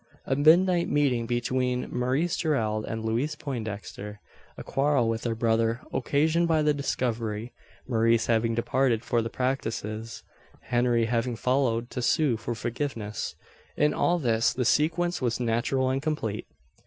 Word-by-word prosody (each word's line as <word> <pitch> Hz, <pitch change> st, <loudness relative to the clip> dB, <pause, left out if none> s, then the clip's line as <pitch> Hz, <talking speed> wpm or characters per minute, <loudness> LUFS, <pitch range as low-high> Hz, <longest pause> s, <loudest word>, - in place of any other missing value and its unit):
A 135 Hz, -, 0 dB
midnight 170 Hz, +4 st, +4 dB
meeting 130 Hz, -6 st, +1 dB
between 125 Hz, +1 st, -1 dB
Maurice 130 Hz, +8 st, +1 dB
Gerald 110 Hz, -9 st, 0 dB
and 110 Hz, 0 st, -4 dB
Louise 125 Hz, +8 st, 0 dB
Poindexter 105 Hz, -6 st, -6 dB, 0.4 s
a -, -, -7 dB
quarrel 135 Hz, -3 st, +1 dB
with 115 Hz, +1 st, -2 dB
her 115 Hz, -1 st, 0 dB
brother, 115 Hz, +1 st, +1 dB
occasioned 155 Hz, +6 st, +2 dB
by 160 Hz, -2 st, +2 dB
the 150 Hz, 0 st, +3 dB
discovery 120 Hz, -5 st, -2 dB, 0.3 s
Maurice 115 Hz, -2 st, +2 dB
having 115 Hz, 0 st, +1 dB
departed 120 Hz, 0 st, +1 dB
for 120 Hz, -, +1 dB
the 115 Hz, -, -3 dB
prairies 115 Hz, -4 st, -3 dB, 0.4 s
Henry 120 Hz, -1 st, +1 dB
having 115 Hz, +1 st, -1 dB
followed 120 Hz, -1 st, 0 dB
to 125 Hz, -, -3 dB
sue 140 Hz, +1 st, +2 dB
for 115 Hz, +2 st, -4 dB
forgiveness 115 Hz, -2 st, -4 dB, 0.4 s
in 150 Hz, 0 st, +3 dB
all 175 Hz, -, +2 dB
this 115 Hz, -7 st, +2 dB
the 125 Hz, -, -1 dB
sequence 170 Hz, +6 st, +1 dB
was 120 Hz, -2 st, 0 dB
natural 125 Hz, +3 st, +1 dB
and 135 Hz, +1 st, -1 dB
complete. 140 Hz, -9 st, -3 dB
120 Hz, 140 wpm, -27 LUFS, 115-140 Hz, 0.4 s, midnight